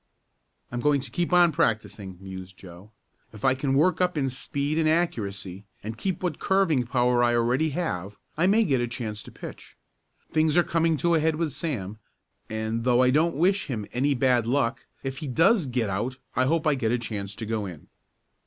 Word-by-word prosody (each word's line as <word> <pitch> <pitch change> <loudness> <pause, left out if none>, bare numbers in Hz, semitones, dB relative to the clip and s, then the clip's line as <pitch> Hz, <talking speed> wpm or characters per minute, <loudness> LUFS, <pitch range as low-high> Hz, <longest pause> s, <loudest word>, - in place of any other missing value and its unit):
"I'm 120 - -3
going 145 +2 +3
to 130 -3 -10
keep 175 +7 -1
on 175 -1 +6
practicing," 105 - -1
mused 95 -1 -9
Joe. 90 +2 -13 0.4
"If 105 +2 -6
I 130 - +5
can 135 0 -1
work 165 +5 +3
up 180 -2 +1
in 135 -2 +1
speed 140 +3 -2
and 155 -1 +3
accuracy, 100 - -1 0.2
and 110 +2 -5
keep 185 - -3
what 175 -5 -2
curving 165 -11 +2
power 125 0 +2
I 120 0 +3
have - - +3
already, 130 +6 +1 0.6
I 170 +4 +2
may 215 +4 +4
get 135 -7 +1
a 120 - 0
chance 110 -3 -5
to - - -12
pitch. - - -10 0.5
Things 155 0 +2
are 175 - +6
coming 165 -1 +1
to 170 +3 +1
a 165 - +4
head 160 0 +1
with 155 -3 -2
Sam, 110 - -4 0.5
and, 110 +1 -2
though 125 0 +4
I 125 - +4
don't 160 +5 +2
wish 190 +6 +2
him 110 -7 -3
any 140 +3 +1
bad 125 -3 +2
luck, 130 -1 0 0.2
if 135 0 -4
he 155 - -5
does 165 - +3
get 120 -3 0
out 120 +7 -2 0.2
I 130 - +3
hope 160 +3 +1
I 155 - +4
get 120 -5 0
a 120 - +2
chance 105 -4 -5
to 110 - -6
go 110 -2 -2
in." 85 -5 -10
130 Hz, 205 wpm, -26 LUFS, 110-160 Hz, 0.6 s, on